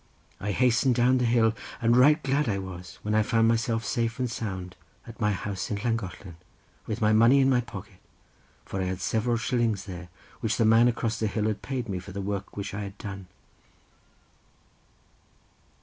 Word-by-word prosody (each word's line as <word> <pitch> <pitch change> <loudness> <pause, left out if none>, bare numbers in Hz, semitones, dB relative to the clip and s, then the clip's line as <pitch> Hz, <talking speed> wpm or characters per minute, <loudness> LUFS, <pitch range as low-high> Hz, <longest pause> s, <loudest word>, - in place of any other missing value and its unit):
I 105 +1 -2
hastened 125 +2 +3
down 125 +2 +3
the 125 - +1
hill, 115 -1 +3 0.3
and 120 -1 +3
right 150 +5 +5
glad 140 0 +1
I 100 - 0
was 90 -2 -8
when 105 - -1
I 110 - +4
found 115 +1 +2
myself 115 0 +1
safe 115 +1 -1
and 125 -2 -1
sound 95 -5 -5 0.3
at 115 +1 -11
my 105 -1 +3
house 95 -1 -3
in 105 - -1
Llangollen, 100 -6 -4 0.5
with 110 +1 -3
my 105 0 +4
money 115 +5 +6
in 135 0 +4
my 125 -1 +3
pocket, 110 -5 -10 0.7
for 95 - -4
I - - 0
had 90 -1 -3
several 115 +4 0
shillings 115 -4 0
there, 90 -3 -8 0.3
which 110 - -1
the 115 - +3
man 115 +2 +6
across 115 -2 -1
the 110 - +1
hill 105 0 -1
had 110 -1 -1
paid 130 -3 -3
me 95 -3 -3
for 95 +1 -10
the 100 - -4
work 100 0 -4
which 100 0 -4
I 105 - -3
had 100 -1 -7
done." 100 -4 -7
110 Hz, 190 wpm, -27 LUFS, 100-120 Hz, 0.7 s, money